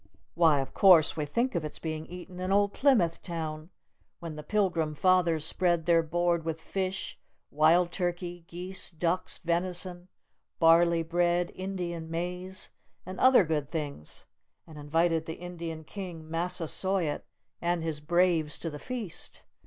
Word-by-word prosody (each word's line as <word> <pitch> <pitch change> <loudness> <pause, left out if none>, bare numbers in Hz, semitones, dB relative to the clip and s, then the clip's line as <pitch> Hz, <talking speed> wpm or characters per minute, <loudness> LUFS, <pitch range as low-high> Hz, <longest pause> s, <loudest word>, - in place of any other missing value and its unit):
Why, 160 -4 +4
of 135 - -7
course, 175 -5 +6
we 150 -2 -2
think 235 - 0
of 170 -4 -1
its 150 - -6
being 155 -1 -5
eaten 180 +1 -9
in 185 +1 -2
old 200 0 +3
Plymouth 220 - +3
Town, 160 -2 -5 0.5
when 165 -2 -6
the 150 - -6
Pilgrim 170 -4 0
Fathers 170 -2 +3
spread 170 -1 +1
their 170 -1 +5
board 170 +1 0
with 160 0 -3
fish, 190 +2 -4 0.3
wild 165 +4 +4
turkey, 175 -1 -3
geese, 180 +2 -4
ducks, 170 +2 -1
venison, 175 +1 -1 0.5
barley 165 0 +5
bread, 175 +1 +1
Indian 175 -4 -4
maize, 180 +3 -3 0.3
and 185 +1 -7
other 260 -5 +7
good 150 -4 -2
things, 145 - -6 0.4
and 155 -2 -11
invited 160 +2 +1
the 160 - -4
Indian 170 -2 -6
King 170 -2 -8
Massasoit 175 0 -1 0.4
and 170 -1 0
his 160 -2 -2
braves 165 -1 +2
to 165 - -5
the 150 - -7
feast. 235 - -6
170 Hz, 145 wpm, -29 LUFS, 160-180 Hz, 0.5 s, other